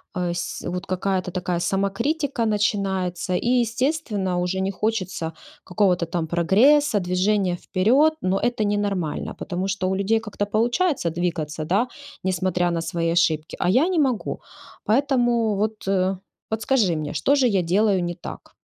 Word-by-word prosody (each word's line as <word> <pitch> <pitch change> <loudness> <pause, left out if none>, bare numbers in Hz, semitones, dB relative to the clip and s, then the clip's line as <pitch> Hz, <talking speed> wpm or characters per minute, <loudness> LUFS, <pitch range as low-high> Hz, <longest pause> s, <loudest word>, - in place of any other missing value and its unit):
Э, 180 -1 -1
с 175 0 -4
вот, 180 +1 -4
какая-то 185 0 -1
такая 180 -1 -2
самокритика 230 - 0
начинается 195 -4 0
и, 235 - -1
естественно, 225 - -1
уже 180 +1 -1
не 195 +1 0
хочется 185 -5 -2 0.3
какого-то 180 -3 +1
там 165 -1 -3
прогресса, 215 - +4
движения 185 +1 +1
вперед. 245 - +3
Но 185 +1 +1
это 240 -3 0
ненормально, 200 -6 -2
потому 185 +1 -3
что 190 -1 -1
у 190 - 0
людей 210 +3 +2
как-то 210 -2 -3
получается 240 - +1
двигаться, 160 -3 -3
да, 205 +9 +1 0.4
несмотря 180 -1 0
на 165 -1 -1
свои 165 0 -1
ошибки, 160 -2 +1
а - - +1
я 260 - +4
не 365 -3 +1
могу. 260 -7 0 0.4
Поэтому, 240 -3 +2
вот, 215 +2 0 0.7
подскажи 220 -5 +1
мне, 155 -1 -4
что 280 - +2
же 270 -3 +3
я 200 -5 +2
делаю 190 +2 +2
не 175 0 -2
так? 175 - -10
195 Hz, 150 wpm, -23 LUFS, 180-225 Hz, 0.7 s, прогресса